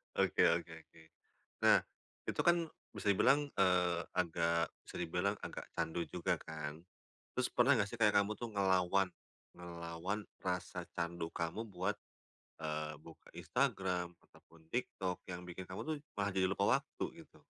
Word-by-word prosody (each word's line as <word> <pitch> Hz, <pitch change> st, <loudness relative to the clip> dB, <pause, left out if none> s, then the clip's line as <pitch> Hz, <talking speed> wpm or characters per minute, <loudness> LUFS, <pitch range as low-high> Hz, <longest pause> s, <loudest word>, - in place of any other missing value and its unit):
Oke -, -, +4 dB
oke -, -, +1 dB
oke. 80 Hz, -, -19 dB, 0.7 s
Nah, -, -, +7 dB, 0.4 s
itu -, -, -4 dB
kan, 175 Hz, 0 st, +6 dB, 0.4 s
bisa 100 Hz, 0 st, +2 dB
dibilang, 145 Hz, +8 st, +4 dB
eee, 90 Hz, -2 st, +4 dB
agak 85 Hz, -1 st, +2 dB, 0.2 s
bisa -, -, -9 dB
dibilang, 90 Hz, +4 st, +1 dB
agak -, -, -5 dB
candu 85 Hz, 0 st, -1 dB
juga, -, -, 0 dB
kan? 75 Hz, -1 st, -5 dB, 0.6 s
Terus, 125 Hz, -, +2 dB
pernah 130 Hz, +3 st, +5 dB
nggak 105 Hz, -4 st, +2 dB
sih, 120 Hz, -, -6 dB
kayak 105 Hz, -2 st, +5 dB
kamu 100 Hz, -, -3 dB
tuh, 120 Hz, -, -3 dB
ngelawan 95 Hz, -1 st, +3 dB, 0.4 s
ngelawan 85 Hz, +3 st, -4 dB, 0.2 s
rasa 90 Hz, -1 st, -2 dB
candu 85 Hz, 0 st, -2 dB
kamu 85 Hz, +7 st, -2 dB
buat, 95 Hz, +1 st, -1 dB, 0.6 s
eee, 75 Hz, -1 st, -2 dB
buka 80 Hz, +1 st, -14 dB
Instagram, 90 Hz, -2 st, 0 dB, 0.2 s
ataupun 80 Hz, -1 st, -21 dB
TikTok, 95 Hz, -7 st, -2 dB
yang 90 Hz, 0 st, -5 dB
bikin 90 Hz, +1 st, -6 dB
kamu 95 Hz, -, -5 dB
tuh, 155 Hz, -, +1 dB, 0.2 s
malah 100 Hz, 0 st, +1 dB
jadi 95 Hz, -1 st, +4 dB
lupa 100 Hz, +1 st, +2 dB
waktu, -, -, -5 dB, 0.2 s
gitu? -, -, -22 dB
90 Hz, 145 wpm, -36 LUFS, 85-100 Hz, 0.7 s, Nah